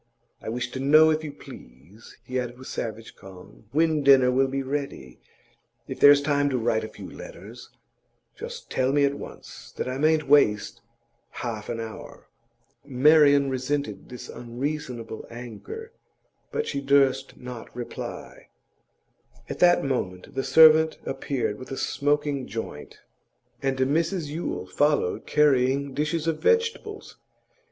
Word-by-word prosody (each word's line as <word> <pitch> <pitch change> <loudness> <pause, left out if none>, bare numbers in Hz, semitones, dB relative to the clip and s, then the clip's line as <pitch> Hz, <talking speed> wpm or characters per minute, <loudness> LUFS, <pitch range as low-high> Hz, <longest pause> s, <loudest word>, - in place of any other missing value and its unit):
I - - -6
wish 125 +2 -3
to 130 - -5
know, 155 +4 +6
if 155 0 -1
you 150 - -5
please,' 85 - -15
he 130 +2 -2
added 120 -1 -5
with 130 - -11
savage 115 0 -6
calm, 90 -11 -14
'when 155 0 +2
dinner 135 -2 +6
will 135 +1 +2
be 135 +1 -3
ready. 135 - -5 0.7
If - - -7
there's 145 0 +7
time 145 -1 +1
to 130 - 0
write 115 -2 0
a - - -4
few 110 - -11
letters, - - -11 0.7
just - - -9
tell 130 +1 +1
me 145 0 +4
at 140 - 0
once, - - -11
that - - -3
I 130 +1 -3
mayn't 155 0 +2
waste 105 -8 +3 0.6
half 110 -3 -5
an 115 - -3
hour.' 110 -1 -9 0.6
Marian 145 +1 +5
resented 140 +3 -3
this 125 - -9
unreasonable 120 -2 -5
anger, 125 - -9 0.6
but 455 - -2
she 140 - -3
durst 135 -1 +2
not 125 -2 -9
reply. 120 -1 -8 1.0
At - - -5
that 175 0 +5
moment 95 -10 -3
the 135 - -2
servant 160 0 +6
appeared 135 -5 -3
with 130 - -10
a 135 - -5
smoking 145 -1 -1
joint, 105 -9 -7 0.6
and 135 -1 -1
Mrs 160 +5 0
Yule 150 - -4
followed 145 +1 0
carrying 140 -1 +2
dishes 155 +2 -1
of 165 -2 -1
vegetables. 460 -2 -1
135 Hz, 140 wpm, -25 LUFS, 120-150 Hz, 1.0 s, there's